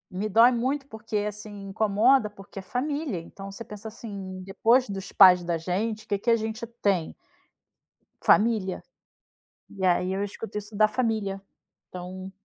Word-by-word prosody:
Me 195 +4 -2
dói 230 +4 +6
muito, 260 +4 -1
porque, 220 -3 -8
assim, 210 -1 -6
incomoda, 215 +4 +3
porque 195 -1 -11
é - - -6
família. 275 - -2
Então 195 +4 -9
você 195 +4 -8
pensa, 210 0 -9
assim, 200 -4 -8
depois 230 +6 +2
dos 195 -1 -5
pais 185 -2 +8
da 170 -1 -1
gente, 205 +6 -2
que 200 -1 -1
que 230 - -1
a 230 - +6
gente 220 +1 -4
tem? 190 -5 +1 1.1
Família. 215 -4 +3 0.8
E 195 -2 -8
aí 180 0 +2
eu 195 +1 -1
escuto 205 +2 -7
isso 210 +1 -12
da 215 +1 +5
família. 215 -4 -1 0.5
Então 185 +1 -8
205 Hz, 155 wpm, -26 LUFS, 190-225 Hz, 1.1 s, pais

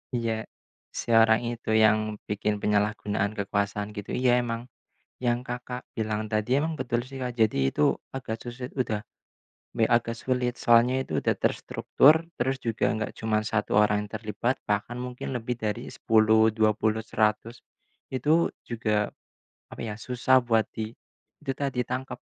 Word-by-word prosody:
Iya. 115 -2 -2 0.5
Seorang 115 -1 +4
itu, 120 -1 -7
yang 110 0 +3
bikin 105 0 -1
penyalahgunaan 105 0 0
kekuasaan 100 0 -2
gitu. 105 -1 -5
Iya, 125 -1 +3
emang 120 0 -4 0.5
yang, 120 -1 0
Kakak, 125 0 -5 0.2
bilang 110 -1 -2
tadi 110 +6 +1
emang 160 0 -2
betul 120 -2 -1
sih, 135 +1 -9
Kak. 125 -1 -3
Jadi 70 -12 +2
itu - - +2 0.2
agak 130 -4 -4
susa 125 +1 -6
udah, 110 -5 0 0.7
me - - 0
agak 115 -1 +2
sulit. 125 0 -1
Soalnya 120 +3 +4
itu - - -2
udah - - +1
terstruktur. 145 +4 +4 0.2
Terus 130 +2 +1
juga 115 -2 -1
enggak 110 0 -3
cuma 110 -1 0
1 110 -1 -1
orang 105 0 +3
yang 100 - -20
terlibat. 110 +3 -1 0.2
Bahkan 105 +3 0
mungkin 125 +1 -5
lebih 120 0 -3
dari 105 -3 -3
10-20-100 110 0 +2 0.6
Itu 155 +6 +2
juga 110 -3 -1 0.6
apa - - -8
ya, 110 -2 -4
susah 125 +2 +2
buat 115 -3 +2
di 110 0 -4 0.5
dita 140 -1 -2
ditangkap. 125 +1 -3
115 Hz, 140 wpm, -27 LUFS, 105-125 Hz, 0.7 s, Seorang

